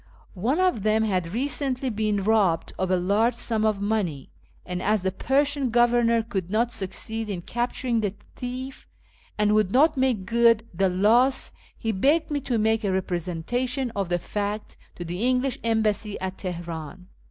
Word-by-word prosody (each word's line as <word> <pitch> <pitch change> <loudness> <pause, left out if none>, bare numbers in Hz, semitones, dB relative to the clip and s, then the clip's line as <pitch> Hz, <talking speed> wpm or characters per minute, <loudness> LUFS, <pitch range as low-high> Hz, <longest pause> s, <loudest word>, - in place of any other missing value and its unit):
One 265 - +1
of 365 - +2
them 215 +2 +2
had 185 -5 0
recently 265 +1 -1
been 210 -2 0
robbed 195 -6 +2
of 185 0 0
a 185 - +3
large 205 +7 +2
sum 225 -2 -1
of 215 -2 +1
money, 200 -10 -2 0.3
and, 180 0 -4
as 210 -1 +1
the 190 - +1
Persian 275 +5 +1
Governor 235 -1 +3
could 190 -5 -4
not 230 +4 +1
succeed 220 +2 -5
in 180 -4 -4
capturing 240 +1 -1
the 205 -2 -2 0.2
thief, 255 +2 -6 0.5
and 210 0 +3
would 210 -3 +2
not 300 +5 +4
make 255 -7 +1
good 230 +1 +4
the 190 +3 +2
loss, 230 +8 +3 0.3
he 225 - -1
begged 285 - +2
me 290 -1 0
to 250 -3 -1
make 220 +1 +2
a 200 - +1
representation 190 - -2
of 195 -3 -1
the 175 - +2
facts 205 +3 -4 0.2
to 175 - -6
the 175 +3 -4
English 255 +1 +1
Embassy 220 -2 0
at 190 0 -5
Teheran. 170 -2 -6
220 Hz, 165 wpm, -25 LUFS, 190-245 Hz, 0.5 s, not